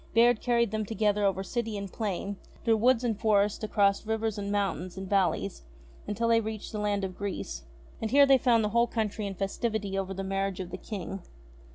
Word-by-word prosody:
Bayard 235 0 +5
carried 235 -3 +2
them 215 0 -1
together 210 -1 +1
over 190 -1 +1
city 225 0 -3
and 200 -2 -6
plain, 200 -2 -3 0.3
through 225 -1 +3
woods 245 +2 +3
and 225 -4 -1
forests, 210 -1 +2
across 200 -2 +2
rivers, 220 -1 -1
and 200 0 -3
mountains, 190 -3 -1
and 190 0 -5
valleys, 180 - +1 0.5
until 230 +3 0
they 230 0 +5
reached 220 -1 -5
the 215 - -4
Land 205 -1 0
of 185 -1 -3
Greece. 185 - -5 0.4
And 220 - -1
here 280 +3 +7
they 270 -1 +5
found 235 -3 +3
the 210 - +1
whole 235 +2 +3
country 215 -2 -2
in 195 - -5
festivity 200 +1 -2
over 195 0 -3
the 195 - -3
marriage 195 0 -2
of 185 -1 -5
the 185 - -4
King. 195 -2 -6
210 Hz, 205 wpm, -29 LUFS, 195-225 Hz, 0.5 s, here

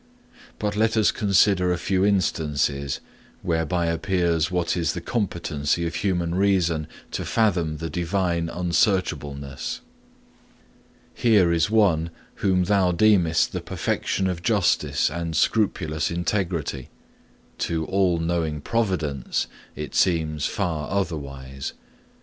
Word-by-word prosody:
But 105 -1 -2
let 110 +1 +2
us 110 - +4
consider 95 -2 +3
a 90 - +1
few 95 +1 0
instances 75 -8 0 0.4
whereby 85 +1 0
appears 85 -1 +1
what 90 -1 0
is 85 -4 0
the - - -4
competency 85 -7 -1
of 85 - -3
human 90 -4 -1
reason 90 -5 +1 0.2
to - - -3
fathom 90 -9 +1
the 80 +2 -4
Divine 85 0 -1
unsearchableness. 80 - -1 1.3
Here 100 -8 +4
is 80 +1 +2
one 95 -7 +3 0.3
whom 95 -2 +2
thou 95 -1 +3
deemest 90 -3 +3
the - - -3
perfection 95 - -1
of 90 -2 -2
justice 100 - +2
and 85 -1 -3
scrupulous 80 -6 +1
integrity; 85 -6 -2 0.7
to 80 -1 -1
all 95 -2 +2
knowing 80 -2 -1
Providence 80 - -1 0.3
it 75 -2 -6
seems 80 -4 +1
far 85 -6 -2
otherwise. 70 -8 -4
85 Hz, 115 wpm, -24 LUFS, 80-95 Hz, 1.3 s, us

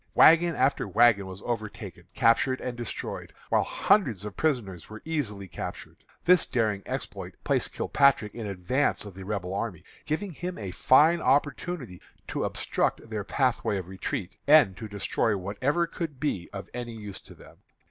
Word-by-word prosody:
Wagon 165 +1 +6
after 130 -4 +1
wagon 100 0 +4
was 95 +1 -9
overtaken, 110 -3 -5
captured, 130 +3 +3
and 125 -1 -4
destroyed, 120 -1 -6 0.2
while - - +4
hundreds 120 - +2
of 105 - -6
prisoners 115 - -1
were 110 0 -10
easily 115 -12 -3
captured. - - -7 0.3
This 180 -1 +5
daring 110 -5 0
exploit - - -5
placed - - +1
Kilpatrick 135 -7 +3
in 115 -3 -5
advance 100 +9 0
of 100 - -9
the 95 +1 -9
Rebel 95 -2 -3
army, 100 -5 -3 0.2
giving 180 +6 -2
him 175 +3 -5
a 100 -4 -5
fine 155 - +5
opportunity 145 - 0 0.3
to - - -1
obstruct 115 - -1
their 105 -2 -2
pathway 125 -4 0
of 90 -2 -5
retreat, 95 -1 -4
and 145 -11 +6
to 110 +2 -7
destroy 105 +1 0
whatever 125 - 0
could 160 -5 -5
be 120 - -2
of 100 -1 -7
any 120 -1 -5
use 105 -3 -8
to - - -14
them. - - -16
115 Hz, 160 wpm, -27 LUFS, 100-145 Hz, 0.3 s, Wagon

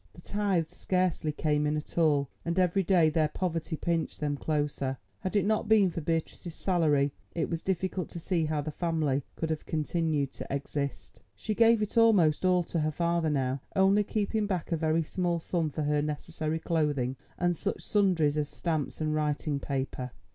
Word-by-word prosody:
The 175 - -14
tithes 195 -5 -1
scarcely 180 -4 0
came 150 0 0
in 150 +1 0
at 150 - -7
all, 150 -4 +3 0.2
and 170 +1 -2
every 185 +1 +3
day 170 -4 +4
their 155 0 +2
poverty 165 0 -2
pinched 165 -1 -1
them 145 -1 -1
closer. 145 -3 -1 0.2
Had 190 +1 -4
it 205 - +3
not 215 0 +1
been 205 -4 +5
for 170 - -4
Beatrice's 165 +2 -3
salary 150 -6 +2 0.2
it 165 0 -1
was 165 -1 -2
difficult 190 -1 -2
to 170 - -7
see 170 -1 0
how 150 -1 -1
the 155 +2 -4
family 155 -4 0
could 160 -1 -2
have 155 - -4
continued 155 -2 0
to - - -8
exist. 140 0 -4
She 215 - -3
gave 230 0 +5
it 210 +2 +1
almost 190 -10 +4
all 180 -1 +4
to 165 - -2
her 155 0 +1
father 170 +1 +1
now, 135 -2 0
only 195 +2 +4
keeping 210 +1 -1
back 180 -4 -2
a - - +3
very 160 0 +1
small 175 +1 -1
sum 165 -1 -1
for 150 +1 -3
her 150 0 +1
necessary 155 +1 -3
clothing 150 -6 0 0.2
and 175 -1 +1
such 200 +5 -3
sundries 175 -8 +2
as 150 -1 -1
stamps 160 -3 -2
and 155 0 0
writing 150 -1 0
paper. 135 -2 -3
160 Hz, 185 wpm, -29 LUFS, 150-180 Hz, 0.2 s, been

